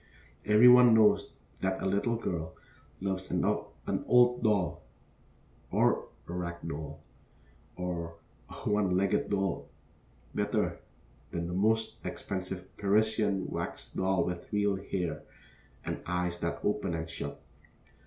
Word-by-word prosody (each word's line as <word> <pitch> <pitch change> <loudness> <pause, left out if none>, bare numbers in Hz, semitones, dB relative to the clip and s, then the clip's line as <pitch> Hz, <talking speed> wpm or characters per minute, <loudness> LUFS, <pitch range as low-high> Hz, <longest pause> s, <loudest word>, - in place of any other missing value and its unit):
Every 105 +3 +7
one 125 -2 +8
knows 110 -1 +4 0.3
that 95 0 -1
a - - -3
little 100 +5 +1
girl 85 -8 -3 0.5
loves 95 -1 -2
an - - +1
old 125 0 +2
doll, 100 -7 +1 0.9
or - - +2 0.2
a 85 - -6
rag 90 -1 -3
doll, 80 -1 -6 0.7
or 85 -2 -4 0.3
a - - -9
one 100 -3 +2
legged 100 +1 +1
doll, 95 -3 -1 0.6
better - - 0 0.5
than 85 -1 -3
the 85 - -4
most 110 +4 +1
expensive 95 -1 -5
Parisian 105 -1 +2
wax - - -5
doll 95 -2 +1
with 90 -1 -5
real 105 -1 +2
hair, 95 -3 -3 0.6
and - - -3
eyes 90 0 -1
that 85 - -3
open 100 -4 0
and 80 0 -3
shut. 80 - -6
95 Hz, 125 wpm, -30 LUFS, 90-105 Hz, 0.9 s, one